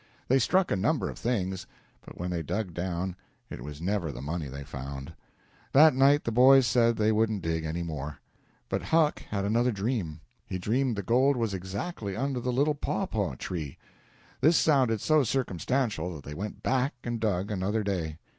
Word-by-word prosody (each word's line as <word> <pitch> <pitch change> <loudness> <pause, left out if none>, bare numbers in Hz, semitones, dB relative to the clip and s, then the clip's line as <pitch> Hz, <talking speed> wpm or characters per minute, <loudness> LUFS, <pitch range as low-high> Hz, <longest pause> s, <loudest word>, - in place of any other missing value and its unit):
They 135 +2 +5
struck 185 +9 +2
a - - +3
number 115 +11 0
of - - -11
things, 95 -6 -2 0.4
but - - -12
when 90 +1 -3
they 85 -2 -1
dug 90 +3 -3
down 90 +1 -3 0.4
it - - -7
was 75 +4 -8
never 95 -4 -1
the - - -8
money 75 +3 -3
they 70 +1 -7
found. 70 +2 -7 0.6
That 155 +3 +8
night 140 +3 +4
the 115 - -2
boys 130 +3 +7
said 115 -1 +3
they 110 0 +2
wouldn't 110 -3 +1
dig 80 -1 -1
any 80 +2 -2
more. 75 -3 -5 0.5
But - - -1
Huck 160 -2 +2
had 100 -1 -1
another 120 +4 +2
dream. 100 -7 -2 0.3
He 95 - -3
dreamed 120 +6 0
the 100 - -3
gold 130 +6 +3
was 115 -4 -1
exactly 100 - -4
under 135 +1 -1
the 125 +1 -1
little 140 +5 +2
pawpaw 110 - -2
tree. 75 0 -5 0.6
This 160 +5 +5
sounded 130 -8 +3
so 155 -1 +4
circumstantial 110 -6 -1
that 70 - -9
they 75 - -7
went 100 +7 -6
back 130 +1 +1
and 120 -1 -3
dug 100 -2 -1
another 105 +2 -1
day. 85 -6 -2
105 Hz, 185 wpm, -28 LUFS, 85-125 Hz, 0.6 s, That